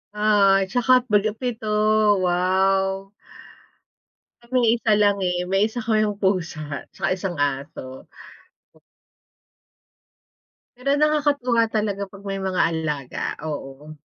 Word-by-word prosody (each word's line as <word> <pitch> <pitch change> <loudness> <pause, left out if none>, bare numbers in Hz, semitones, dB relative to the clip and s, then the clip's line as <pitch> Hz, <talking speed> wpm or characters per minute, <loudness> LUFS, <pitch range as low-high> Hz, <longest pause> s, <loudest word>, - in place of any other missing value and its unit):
Oo, 200 -2 +3
tsaka 245 +4 +2 0.2
bale 210 +1 +3
7, 240 -4 -4 0.6
wow! 190 +2 +1 1.3
Sa'min, 245 0 0
isa 220 -3 +2
lang, 205 -1 +2
eh, 180 -1 -1
may 195 +4 +1
1 240 +1 -5
kaming 215 -2 +1
pusa, 165 -7 -2
tsaka - - -2
1 185 -3 -4
aso. 135 -2 -4 2.7
Pero 250 +3 -4
nakakatuwa 285 -6 +2
talaga 210 -2 -2
'pag 195 0 -15
may 195 0 -3
mga 190 -1 -1
alaga, 150 -5 -4 0.2
oo. 145 -1 -7
195 Hz, 105 wpm, -22 LUFS, 180-220 Hz, 2.7 s, Oo